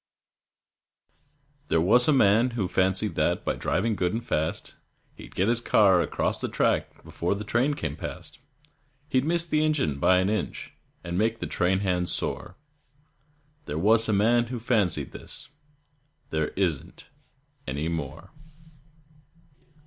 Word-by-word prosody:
There 80 - +2
was 115 +9 +4
a - - +5
man 115 -2 +4
who 100 -5 0
fancied 95 +3 0
that - - 0
by - - 0
driving 110 +5 0
good 90 -2 0
and 115 +1 -3
fast 80 +1 -2 0.4
He'd - - -13
get 95 - +1
his 120 0 +2
car 95 -6 +4
across 80 - -1
the - - -1
track - - -1
before 85 +4 -2
the 105 - -5
train 125 +7 +1
came 80 - -4
past; - - -8 0.7
He'd 130 -3 +2
miss 170 +1 +1
the 155 -2 +1
engine 140 - 0
by 90 +5 +4
an 95 +1 +2
inch, 105 +1 -3 0.3
and 85 +1 -3
make 110 +1 +1
the - - -5
train 95 +2 0
hands 90 -2 0
sore. 90 - -4 1.1
There 75 - -3
was 110 +6 +3
a - - +3
man 115 +4 +3
who 125 0 -5
fancied 110 -6 0
this; - - -11 0.8
there 80 -1 0
isn't 85 -8 -2 0.6
any 70 +4 -2
more. 80 +2 -5
100 Hz, 145 wpm, -26 LUFS, 85-115 Hz, 1.1 s, a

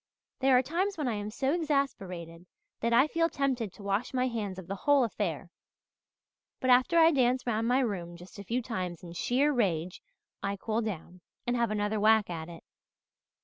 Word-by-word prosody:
There 265 -1 +5
are 250 - +3
times 360 +8 -1
when 300 -4 -1
I 240 - 0
am 205 0 -4
so 265 +6 -1
exasperated 190 - -2 0.3
that 235 - 0
I 240 +4 +6
feel 330 +2 +1
tempted 255 - -1
to 205 - -13
wash 200 +6 -1
my 255 0 +2
hands 210 -5 -4
of 190 - -8
the 190 - -4 0.2
whole 285 -2 +6
affair; 185 -6 -3 1.1
but 255 - +2
after 255 +7 +4
I 325 0 +7
dance 255 -3 +2
round 230 -1 0
my 255 +2 +3
room 175 -8 -3
a 175 - -10 0.2
few 240 +5 -2
times 185 -7 -4
in 170 -1 -9
sheer 265 - +1
rage 180 - -1 0.4
I 200 0 -2
cool 220 +3 -1
down 180 -4 -6 0.2
and 245 - 0
have 235 -2 +1
another 210 0 -1
whack 215 -2 +4
at 160 -1 -5
it. 170 -1 -11
225 Hz, 190 wpm, -30 LUFS, 190-260 Hz, 1.1 s, I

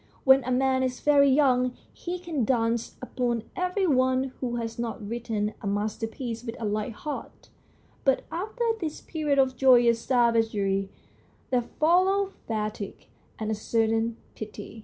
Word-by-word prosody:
When 265 0 +6
a - - -3
man 260 +1 +2
is 255 -1 -1
very 285 -1 +5
young 255 -3 +3 0.2
he 355 +1 -5
can 335 -7 -2
dance 230 -1 0
upon 240 -3 -1
every 365 +2 0
one 260 -3 +2
who 245 -2 -2
has 230 -1 -4
not 230 -3 -4
written 220 -2 -2
a 205 - -4
masterpiece 225 +3 -3
with 230 -1 -6
a 230 - -3
light 210 +3 -2
heart, 295 +7 -7 0.5
but 270 -1 +2
after 425 +8 -3 0.2
this 315 -3 -4
period 300 -3 -1
of 265 -1 +3
joyous 245 -2 +5
savagery 225 -6 +1 0.6
there 250 -1 +3
follows 370 +9 +2 0.2
fatigue 215 -2 -4 0.3
and 220 0 -3
a - - +1
certain 225 +1 0 0.2
pity. 215 +1 -8
245 Hz, 145 wpm, -27 LUFS, 225-275 Hz, 0.6 s, When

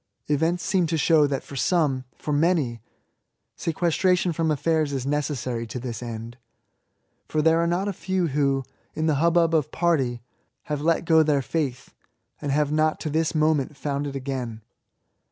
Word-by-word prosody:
Events 165 +4 +1
seem 185 -3 +2
to 160 0 0
show 155 -1 +4
that 140 -1 -2
for 140 - -10
some 135 -3 +1
— - - -37
^for 150 - -3
many 145 - +1 0.4
— - - -54
sequestra 175 +2 +2
tion 180 0 0
firom 165 +1 0
ajSairs 155 0 +1
is 135 -2 -2
necessary 135 -5 -2
to 120 +3 -5
this 120 -2 -5
end; 115 0 -7 0.9
for 155 -1 0
there 160 +1 +4
are 170 - +2
not 180 +4 0
a 200 - -1
few 185 0 -1
who, 140 -2 +1 0.3
in 160 - -1
the 150 -2 +1
hubbub 170 0 +3
of 150 -2 +2
party, 135 -9 0 0.4
have 150 -1 -3
let 165 +2 +1
go 160 -1 +5
their 145 -3 +2
faith, 130 -2 -3 0.5
and 145 - -2
have 150 +1 +1
not 155 0 +2
to 155 - -4
this 160 +1 0
moment 150 -2 +1
found 140 +1 -2
it 140 - -6
again. 130 -5 -4
150 Hz, 180 wpm, -25 LUFS, 135-165 Hz, 0.9 s, go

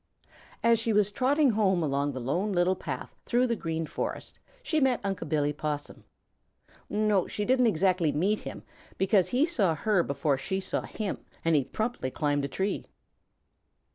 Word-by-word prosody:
As 230 -1 +5
she 225 -1 0
was 210 0 +3
trotting 275 +4 +3
home 190 -5 +2
along 140 -1 0
the 130 - -4
Lone 175 - -1
Little 180 +1 +3
Path - - -6
through 245 +1 +2
the 235 -2 0
Green 165 -4 -3
Forest, - - -5 0.2
she 315 -10 +1
met 265 -3 +3
Unc' 195 -1 -3
Billy 150 -2 +1
Possum. 150 0 -5 0.8
No, 210 -3 +2
she 210 - -3
didn't 255 0 +4
exactly 180 -4 +2
meet 195 +9 +1
him, - - -8 0.3
because 190 -1 +3
he 255 +4 +3
saw 205 - +1
her 200 +3 +2
before 140 -2 0
she 190 +5 -2
saw 195 - -2
him, 210 -3 -4 0.3
and 165 -1 +4
he 140 - +3
promptly 220 - -3
climbed 145 0 0
a - - 0
tree. 195 +8 -2
190 Hz, 170 wpm, -28 LUFS, 155-220 Hz, 0.8 s, As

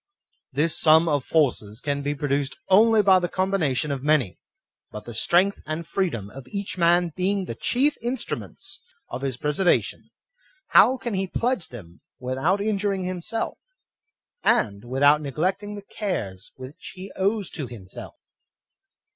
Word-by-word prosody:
This 155 +3 +1
sum 160 +1 +6
of 145 -4 +1
forces 120 -9 +1
can 140 0 -2
be 145 +1 -2
produced 140 -1 -1
only 215 +2 +6
by 190 -1 +6
the 175 -1 -2
com 190 +2 -1
bination 150 -6 0
of 135 - -4
many; 145 -9 +1 0.5
but 105 - -9
the 120 - -8
strength 180 - +2
and 155 +2 -3
freedom 160 - -2
of 135 -1 -11
each 200 +4 -4
man 175 -1 +3
being 190 +1 0
the - - -5
chief 280 +4 +1
instruments 225 - -4 0.3
of 125 - -5
his 135 -3 -2
preservation, 150 +7 +1 0.6
how 260 - +6
can 235 -3 -4
he 190 0 -1
pledge 235 -1 -1
them 85 -9 -12 0.2
without 135 +9 0
injuring 200 -2 0
himself, 185 +5 -3 0.8
and 100 0 +2
without 145 +4 +4
neglecting 185 +9 -2
the 205 - -8
cares 105 - -4
which 130 +3 -10
he 190 +1 -9
owes 200 0 0
to 145 -5 -5
him 110 -7 -11
self - - -9
165 Hz, 150 wpm, -24 LUFS, 135-195 Hz, 0.8 s, sum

